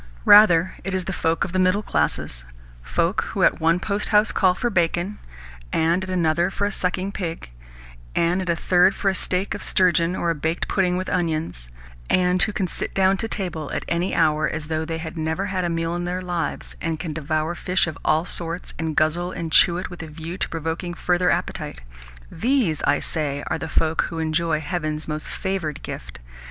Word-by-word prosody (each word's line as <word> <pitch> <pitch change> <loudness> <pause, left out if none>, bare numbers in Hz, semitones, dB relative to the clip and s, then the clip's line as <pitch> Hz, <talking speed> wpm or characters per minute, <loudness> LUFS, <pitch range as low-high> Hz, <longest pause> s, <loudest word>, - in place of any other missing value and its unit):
Rather, 190 -4 +7
it 195 -1 -2
is 185 -1 -2
the 190 - -3
folk 165 -1 0
of - - -3
the 185 - 0
middle 185 +3 +3
classes 75 - 0 0.4
folk 165 - 0
who 195 - -1
at - - +4
one 165 +2 +3
posthouse 210 +2 +2
call 185 -2 +3
for 240 +4 -1
bacon, 175 +2 0 0.5
and 170 +3 +2
at 185 - -6
another 170 -1 +2
for 200 +1 -2
a 205 - 0
sucking 185 0 -1
pig, 165 - -5 0.6
and 175 +3 +2
at 180 - -4
a 170 - +3
third 180 +3 +3
for 195 - +1
a - - +1
steak 185 +1 -1
of - - -6
sturgeon 180 -2 +2
or 170 - 0
a - - +1
baked 160 +2 -2
pudding 180 -2 +1
with 185 - -3
onions, 160 - -2 0.4
and 180 0 +2
who 215 - +3
can 200 -2 -1
sit 175 - -4
down 190 0 +4
to 225 - -2
table 175 -8 -4
at - - -3
any 170 +3 0
hour, 155 -2 +3
as 155 -1 -5
though 160 0 -1
they 165 0 -3
had 160 0 -6
never 160 +5 -1
had 190 -2 -2
a 175 - 0
meal 165 0 -1
in 175 0 -3
their 180 +1 -2
lives, 175 -4 -3
and 160 -2 -2
can 160 -3 -4
devour 155 +1 -1
fish 180 +1 +1
of 160 - -5
all 160 +2 +2
sorts, 170 0 -2
and 160 -2 -2
guzzle 175 +4 +1
and 165 -3 -5
chew 175 +1 +5
it 185 - -5
with 175 - -8
a 160 - -7
view 160 +3 -7
to - - -3
provoking 165 +2 -3
further 180 +1 +1
appetite - - -2 0.5
these, 230 - +1
I 145 - +4
say, 145 -2 -1
are 160 - 0
the 160 - -4
folk 160 +1 +1
who 165 - -6
enjoy 160 0 0
heaven's 155 -2 -3
most 155 0 -4
favoured 190 -7 -3
gift. - - -7
170 Hz, 205 wpm, -23 LUFS, 160-185 Hz, 0.6 s, Rather